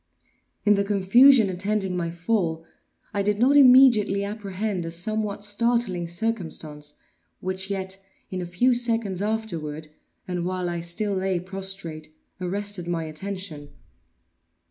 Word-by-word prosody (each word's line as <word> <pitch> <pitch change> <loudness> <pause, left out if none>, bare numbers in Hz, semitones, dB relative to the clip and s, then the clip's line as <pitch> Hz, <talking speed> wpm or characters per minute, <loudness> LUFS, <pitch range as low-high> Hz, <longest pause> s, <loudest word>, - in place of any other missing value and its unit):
In 210 - +6
the 200 -1 +2
confusion 210 +5 +5
attending 195 0 -2
my 170 -2 -2
fall, 170 -2 -1 0.5
I 200 - 0
did 205 +1 +1
not 255 +6 +4
immediately 250 -7 +6
apprehend 200 -2 -3
a 165 - -4
somewhat 205 +4 -2
startling 205 -4 +1
circumstance, 165 -7 -4 0.4
which 185 +1 -2
yet, 190 0 -2 0.3
in 185 -1 -3
a 175 - -5
few 245 +9 +2
seconds 225 -6 0
afterward, 165 -9 -3 0.4
and 180 -2 -2
while 180 0 -2
I 170 - -3
still 185 +5 -2
lay 190 -1 0
prostrate, 190 -4 -5 0.3
arrested 200 0 -3
my 170 -1 -1
attention. 160 -2 -6
195 Hz, 125 wpm, -25 LUFS, 175-210 Hz, 0.5 s, In